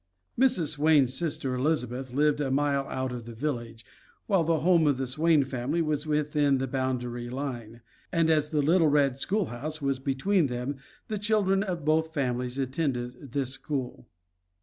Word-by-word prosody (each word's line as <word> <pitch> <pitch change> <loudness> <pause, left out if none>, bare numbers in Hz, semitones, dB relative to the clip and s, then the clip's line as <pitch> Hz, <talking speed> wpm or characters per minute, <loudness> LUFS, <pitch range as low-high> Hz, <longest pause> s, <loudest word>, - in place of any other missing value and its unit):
Mrs. 230 - +3
Swain's 150 -4 +3
sister 140 -4 -1
Elizabeth 130 -2 -1
lived 150 +2 +2
a 140 - -1
mile 140 0 +1
out 130 -1 -3
of 120 -2 -6
the 115 -1 -9
village, 120 -4 -4 0.4
while 195 -5 +2
the 160 -1 +1
home 170 -2 +4
of 140 -3 +2
the 135 - -2
Swain 150 +3 +3
family 135 +4 -2
was 155 -2 -1
within 150 -2 +2
the 130 - -1
boundary 125 -2 -3
line, 120 -4 -5 0.3
and 165 -2 +2
as 155 -2 +2
the 150 -3 +1
little 165 +2 +4
red 140 -3 +2
school 200 +7 0
house 155 +6 -4
was 140 -2 -1
between 145 +6 +1
them 125 +2 -4 0.3
the 215 -2 -3
children 200 -2 +2
of 180 -6 -3
both 160 +1 +1
families 125 -2 -1
attended 130 -2 -3
this 135 -3 -1
school. 135 -2 -4
140 Hz, 170 wpm, -28 LUFS, 130-160 Hz, 0.4 s, home